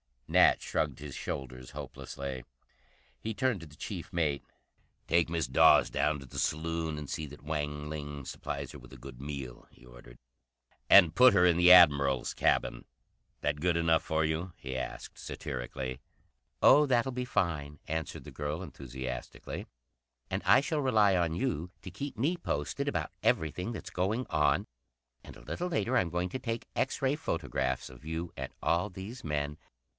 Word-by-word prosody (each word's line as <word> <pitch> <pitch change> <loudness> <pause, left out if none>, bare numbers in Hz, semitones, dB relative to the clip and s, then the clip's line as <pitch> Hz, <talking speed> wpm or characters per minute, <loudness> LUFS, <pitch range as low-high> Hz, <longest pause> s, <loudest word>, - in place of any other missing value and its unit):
Nat - - +5
shrugged - - -1
his 75 -1 -7
shoulders 65 -2 -6
hopelessly. 70 -2 -6 0.7
He 110 - -3
turned 130 -2 0
to 80 - -9
the 75 - -16
chief - - -6
mate. 75 -5 0 0.6
"Take 85 -1 +3
Miss 85 -3 0
Dawes 65 +1 +6
down 75 -1 +1
to 70 - -10
the 65 - -6
saloon 80 0 -1
and 75 -1 -7
see 80 - -3
that 75 +1 -13
Wang 75 -1 -3
Ling 75 -2 -5
supplies - - -5
her - - -10
with - - -14
a - - -10
good 65 0 -11
meal," 70 -3 -7
he 65 - -20
ordered. - - -14 0.7
"And 90 -5 +8
put 125 +6 +7
her 90 -2 +5
in 85 -2 +4
the 90 +1 +7
Admiral's 70 -7 +6
cabin. - - +1 0.6
That 75 0 0
good 85 +2 +2
enough 80 0 +3
for 80 0 0
you?" 80 +3 -2
he 65 -1 -6
asked 60 -1 -6
satirically. 65 0 -5 0.6
"Oh 150 +1 +8
that'll 130 -1 +2
be 125 0 -3
fine," 80 - -1
answered 80 0 -4
the - - -10
girl 75 +4 -4
enthusiastically. 65 -5 -6 0.6
"And - - -1
I - - +7
shall 150 +2 -1
rely 110 -8 +4
on 85 -2 +1
you 90 - -2
to 95 - -8
keep 140 - -6
me 155 +10 +1
posted 75 - -2
about - - -1
everything 90 +8 0
that's - - -7
going 105 +8 0
on. 75 -1 +2 0.6
And - - -11
a - - -13
little 75 - -3
later 110 - +1
I'm 90 - +2
going 90 +2 -1
to 130 - -4
take 115 -2 -4
X 135 - -1
ray 135 +2 +2
photographs 65 - -2
of 65 +3 -14
you 80 +2 -4
and 65 -1 -5
all 85 +5 +2
these 95 +6 -8
men." 75 -1 -2
80 Hz, 170 wpm, -31 LUFS, 70-95 Hz, 0.7 s, And